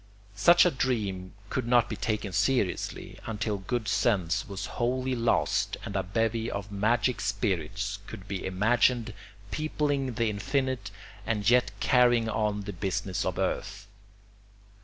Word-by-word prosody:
Such 170 Hz, -, +6 dB
a 180 Hz, -, +4 dB
dream 105 Hz, -9 st, -2 dB, 0.2 s
could 125 Hz, -2 st, -1 dB
not 120 Hz, -1 st, +4 dB
be 110 Hz, -, -4 dB
taken 105 Hz, -3 st, -2 dB
seriously, 100 Hz, 0 st, 0 dB
until 105 Hz, -2 st, -2 dB
good 110 Hz, +4 st, -3 dB
sense 100 Hz, -6 st, +1 dB
was 100 Hz, -2 st, -5 dB, 0.2 s
wholly 130 Hz, +2 st, 0 dB
lost 120 Hz, -1 st, +1 dB
and 100 Hz, -, -6 dB
a 95 Hz, -, +2 dB
bevy 115 Hz, +4 st, -1 dB
of 100 Hz, +1 st, -5 dB
magic 110 Hz, +4 st, +1 dB
spirits 100 Hz, 0 st, -1 dB
could 95 Hz, -, -9 dB
be 100 Hz, -2 st, -4 dB
imagined 115 Hz, +4 st, +2 dB, 0.4 s
peopling 145 Hz, -4 st, -1 dB
the 115 Hz, -1 st, +1 dB
infinite 130 Hz, +1 st, -1 dB, 0.3 s
and 105 Hz, -1 st, -1 dB
yet 125 Hz, +1 st, +5 dB
carrying 120 Hz, -3 st, +4 dB
on 105 Hz, -1 st, 0 dB
the 100 Hz, 0 st, -6 dB
business 95 Hz, +1 st, -2 dB
of 90 Hz, -1 st, -2 dB
earth. 100 Hz, +2 st, -2 dB
110 Hz, 140 wpm, -28 LUFS, 100-120 Hz, 0.4 s, Such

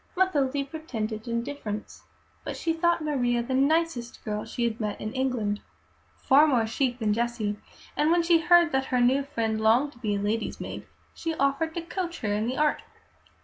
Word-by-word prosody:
Mathilde 285 Hz, -7 st, +1 dB
pretended 225 Hz, -8 st, -5 dB
indifference, 235 Hz, -3 st, -4 dB, 0.4 s
but -, -, -5 dB
she 330 Hz, -, 0 dB
thought 340 Hz, 0 st, +1 dB
Maria 245 Hz, -5 st, +1 dB
the 260 Hz, +2 st, -3 dB
nicest 275 Hz, -2 st, 0 dB
girl 210 Hz, -1 st, -3 dB
she 240 Hz, -, -3 dB
had 230 Hz, -1 st, -1 dB
met 210 Hz, -2 st, -3 dB
in 215 Hz, +1 st, -5 dB
England, 245 Hz, -6 st, -1 dB, 0.6 s
far 290 Hz, +4 st, +5 dB
more 245 Hz, -6 st, +2 dB
chic 245 Hz, +2 st, -1 dB
than 215 Hz, -4 st, +1 dB
Jessie; 230 Hz, -2 st, -1 dB, 0.4 s
and 300 Hz, +1 st, +2 dB
when 340 Hz, 0 st, +4 dB
she 335 Hz, -1 st, +4 dB
heard 345 Hz, 0 st, +5 dB
that 265 Hz, 0 st, +1 dB
her 250 Hz, -1 st, 0 dB
new 255 Hz, +3 st, +4 dB
friend 225 Hz, -5 st, -2 dB
longed 240 Hz, +7 st, +3 dB
to 240 Hz, -, -19 dB
be 210 Hz, -4 st, -1 dB
a -, -, -1 dB
lady's 215 Hz, +2 st, -2 dB
maid, -, -, -7 dB, 0.3 s
she 325 Hz, -1 st, -3 dB
offered 275 Hz, +4 st, 0 dB
to 340 Hz, -, -3 dB
coach 345 Hz, 0 st, -4 dB
her 205 Hz, -2 st, 0 dB
in 215 Hz, +2 st, 0 dB
the 255 Hz, -, -2 dB
art. 300 Hz, 0 st, +2 dB
260 Hz, 190 wpm, -27 LUFS, 225-310 Hz, 0.6 s, far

